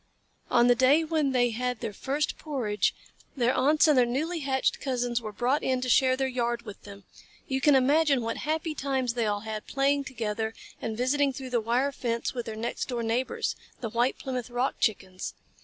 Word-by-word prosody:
On 240 -1 +5
the 245 - +6
day 260 +6 +4
when 310 -3 0
they 245 -2 +2
had 250 +1 -2
their 225 -3 -4
first 280 +8 -2
porridge, 220 - -1 0.4
their 245 0 +2
aunts 295 +5 +4
and 300 - +5
their 250 - +6
newly 315 +8 -1
hatched 270 -2 0
cousins 245 -3 -1
were 215 -2 -6
brought 250 +7 +1
in 260 -1 0
to 255 - -2
share 255 +1 +4
their 265 0 0
yard 240 -2 -1
with 210 -4 -10
them. 200 -1 -11 0.4
You 265 -1 -1
can 290 0 +5
imagine 280 0 +3
what 230 0 -2
happy 315 +1 -2
times 265 -4 -1
they 235 -2 0
all 205 -1 -1
had, 215 -1 -6
playing 280 0 +1
together 220 -3 -3 0.3
and 220 -1 -3
visiting 275 +3 +2
through 260 -1 -7
the 240 -2 +2
wire 245 +5 +1
fence 235 -3 -2
with 240 -2 -4
their 220 - -4
next 230 +2 -3
door 240 -3 -2
neighbors, 235 +3 -1 0.2
the 230 - -4
White 240 +3 +1
Plymouth 255 -2 -4
Rock 245 +2 -1
Chickens. 190 -4 -2
250 Hz, 200 wpm, -28 LUFS, 230-275 Hz, 0.4 s, the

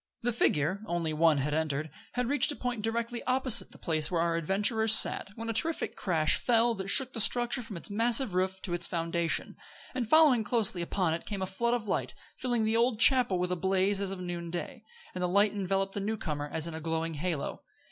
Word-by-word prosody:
The 245 0 0
figure 180 -3 0
only 170 -3 -2
one 160 -1 +3
had 145 +2 -2
entered 155 -1 -2 0.2
had 250 0 -1
reached 285 +2 +4
a - - -3
point 245 -4 -4
directly 230 +2 -3
opposite 255 -2 +1
the - - -13
place 155 -3 0
where 175 - -1
our 170 0 0
adventurers 210 +6 +2
sat, - - +3
when 230 0 -7
a 230 - -2
terrific 325 +8 0
crash 160 -5 +2
fell 235 -1 +2
that 195 -3 -6
shook 255 +5 +3
the - - -5
structure 240 +2 +2
from 225 -5 -8
its 170 - -5
massive 230 +1 +1
roof 190 +1 -1
to 175 - -4
its 175 0 -1
foundation; 165 -1 -2 0.4
and 240 -4 -3
following 300 -8 +5
close 215 -2 +1
upon 175 0 -1
it 165 - -6
came 200 -3 -4
a - - -1
flood 235 +6 -1
of 225 -3 -5
light, - - -2 0.2
filling 240 -3 -1
the 220 +1 0
old 235 -1 +1
chapel 245 -6 +6
with 180 0 -2
a - - 0
blaze 190 +2 0
as 200 - -1
of 195 -1 -5
noonday; 175 -1 -6 0.3
and 180 - -5
the 180 - +1
light 200 +3 +2
enveloped 195 -1 -2
the - - -3
new 215 +3 -3
comer 150 -7 -4
as 160 -1 -1
in 170 - -5
a 160 - -7
glowing 165 +1 -3
halo. 160 -1 -4
195 Hz, 220 wpm, -29 LUFS, 170-230 Hz, 0.4 s, chapel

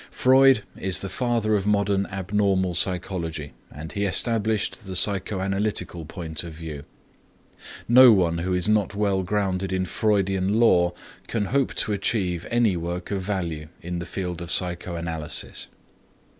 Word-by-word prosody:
Freud 130 -3 +5
is 95 -1 -2
the 95 - -4
father 115 -3 0
of 100 0 -1
modern 100 -1 +1
abnormal 95 -1 0
psychology 85 -4 -2 0.2
and 80 +3 -8
he 100 -1 -2
established 110 0 0
the 95 - -5
psychoanalytical 95 -3 -1
point 80 -3 -5
of 85 -2 -8
view. 75 -3 -8 1.0
No 125 +1 +9
one 85 -5 +2
who 90 +2 -2
is 90 +2 +1
not 105 -2 +1
well 100 -2 +1
grounded 95 0 -1
in 95 0 0
Freudian 100 0 +1
lore 90 -7 +4 0.3
can 110 -3 -1
hope 140 -2 +1
to 105 - 0
achieve 95 -4 -1
any 115 -5 +2
work 85 +2 -4
of 100 -1 -1
value 85 -6 -3 0.2
in 90 +1 -4
the 85 - -6
field 90 -3 -4
of 85 - -7
psychoanalysis. 85 -3 -3
95 Hz, 145 wpm, -24 LUFS, 85-105 Hz, 1.0 s, No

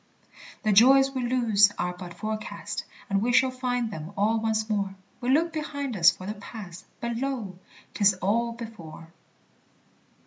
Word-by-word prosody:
The 215 - +2
joys 270 +6 +6
we 260 -1 -3
lose 220 -5 +4
are 180 0 -2
but 180 -1 -9
forecast, 215 +3 -5 0.2
And 195 0 +1
we 240 +3 +1
shall 260 +1 +4
find 245 -3 -2
them 160 +1 -7
all 220 +3 +2
once 220 -1 0
more; 200 -3 -1 0.2
We 245 0 -3
look 320 +5 +3
behind 285 -5 -4
us 175 -2 +7
for 185 - -5
the 210 - -3
Past, 205 -4 -10
But 235 -1 -3
lo! 235 -8 -4 0.3
'tis 200 -2 +4
all 225 +6 0
before! 180 -9 -10
220 Hz, 160 wpm, -26 LUFS, 195-245 Hz, 0.3 s, us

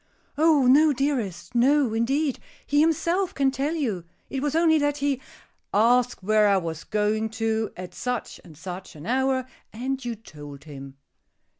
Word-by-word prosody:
"Oh, 305 -2 +4
no, 295 +5 +6
dearest. 255 - -2
No, 260 0 +3
indeed. 270 +5 0 0.3
He 290 - +2
himself 340 +4 +1
can 275 -1 +2
tell 275 +5 -2
you. 220 - -2 0.3
It 270 - -2
was 295 +1 -1
only 325 -1 +4
that 290 0 0
he 280 -2 -1 0.3
" - - -42 0.2
"Asked 240 +1 +3
where 215 +1 +4
I 200 -1 +4
was 165 -3 -4
going 215 +1 0
to, 225 -1 0
at 180 0 -8
such 250 +3 -4
and 160 -5 -15
such 180 +2 -8
an 150 +1 -10
hour, 260 +1 +1 0.3
and 260 +4 -3
you 240 -1 -3
told 145 -9 -12
him." 140 -3 -10
245 Hz, 165 wpm, -25 LUFS, 205-285 Hz, 0.3 s, no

